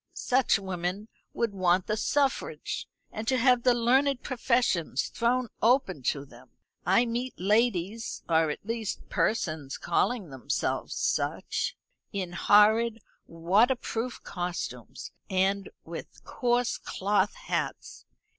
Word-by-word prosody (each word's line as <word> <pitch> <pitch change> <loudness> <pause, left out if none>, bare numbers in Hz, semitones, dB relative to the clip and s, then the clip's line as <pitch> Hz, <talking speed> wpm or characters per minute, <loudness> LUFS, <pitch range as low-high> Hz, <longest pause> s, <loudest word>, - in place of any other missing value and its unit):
Such 255 -2 +2
women 190 +2 -4 0.2
would 230 -3 -1
want 185 -1 +2
the 215 - 0
suffrage, 275 +5 -1 0.2
and 215 +1 -6
to 260 - +3
have 250 0 +4
the 250 0 +4
learned 260 +3 +2
professions 235 - 0
thrown 245 +1 0
open 230 - +3
to 140 -1 0
them. 125 -1 -17 0.4
I 195 +7 +5
meet 240 +2 -3
ladies 210 +1 0
or, 160 -1 +3
at 150 - -5
least, 225 -2 -4
persons 155 -10 -1
calling 215 - 0
themselves 130 -3 -2
such - - -1 0.3
in 185 -3 -3
horrid 215 +5 +4 0.2
waterproof 225 +7 +1
costumes 180 -1 -5 0.2
and 195 +1 +1 0.2
with - - -9
coarse 245 -1 0
cloth 205 - 0
hats. - - -4
215 Hz, 115 wpm, -28 LUFS, 180-245 Hz, 0.4 s, I